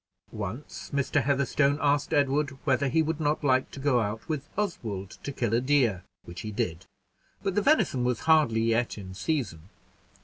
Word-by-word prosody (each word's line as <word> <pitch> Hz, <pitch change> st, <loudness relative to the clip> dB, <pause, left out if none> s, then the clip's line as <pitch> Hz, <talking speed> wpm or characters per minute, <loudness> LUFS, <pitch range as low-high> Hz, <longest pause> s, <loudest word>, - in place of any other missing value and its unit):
Once 110 Hz, +6 st, -6 dB
Mr. 140 Hz, +1 st, +1 dB
Heatherstone 140 Hz, +1 st, +2 dB
asked 145 Hz, -1 st, +1 dB
Edward 140 Hz, 0 st, +1 dB
whether 140 Hz, 0 st, +2 dB
he 160 Hz, +4 st, +2 dB
would 160 Hz, 0 st, -2 dB
not 150 Hz, 0 st, 0 dB
like 130 Hz, -2 st, +2 dB
to -, -, -9 dB
go 135 Hz, -3 st, +2 dB
out 110 Hz, 0 st, -3 dB
with 150 Hz, -3 st, -3 dB
Oswald 110 Hz, -, -3 dB
to 140 Hz, -, -4 dB
kill 120 Hz, -5 st, -1 dB
a 120 Hz, -, +3 dB
deer, 125 Hz, -9 st, +2 dB, 0.2 s
which 85 Hz, +1 st, -8 dB
he 110 Hz, -, -5 dB
did; 95 Hz, -5 st, -3 dB, 0.6 s
but 195 Hz, -, 0 dB
the 210 Hz, -, +2 dB
venison 205 Hz, -, +3 dB
was 125 Hz, -2 st, 0 dB
hardly 155 Hz, -9 st, +4 dB
yet 115 Hz, +1 st, +1 dB
in 95 Hz, -2 st, -8 dB
season. 95 Hz, -, -3 dB
135 Hz, 175 wpm, -28 LUFS, 110-145 Hz, 0.6 s, hardly